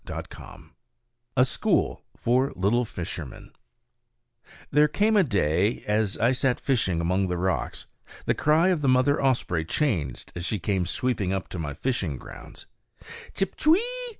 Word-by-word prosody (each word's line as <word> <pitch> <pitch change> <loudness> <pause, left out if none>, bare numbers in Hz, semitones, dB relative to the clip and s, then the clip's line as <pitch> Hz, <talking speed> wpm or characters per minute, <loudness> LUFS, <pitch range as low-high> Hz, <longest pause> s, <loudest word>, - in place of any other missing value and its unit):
A 125 - +6
School - - 0 0.2
for 130 +3 +1
Little 115 +6 +1
Fishermen 90 -5 -7 1.2
There 150 +1 +5
came 210 +8 +2
a 205 - +6
day 100 - +1
when, - - -9
as 105 -2 +1
I 115 +3 +3
sat 130 -1 +1
fishing 110 -11 0
among 95 +3 +1
the 90 -1 -2
rocks, 95 +2 -2 0.4
the - - +2
cry 160 +4 +3
of 175 -5 +1
the 140 - +2
mother 130 +3 +3
osprey 120 -11 +1
changed 80 - -2
as 85 - -5
she 105 +5 -1
came 95 -1 -1
sweeping 100 +1 -1
up 95 -1 -3
to 90 - -6
my 75 -3 -4
fishing 95 - -2
grounds, - - -11 0.7
_Chip, 195 -1 -1
ch'wee! 320 +4 +5
110 Hz, 150 wpm, -26 LUFS, 90-135 Hz, 1.2 s, A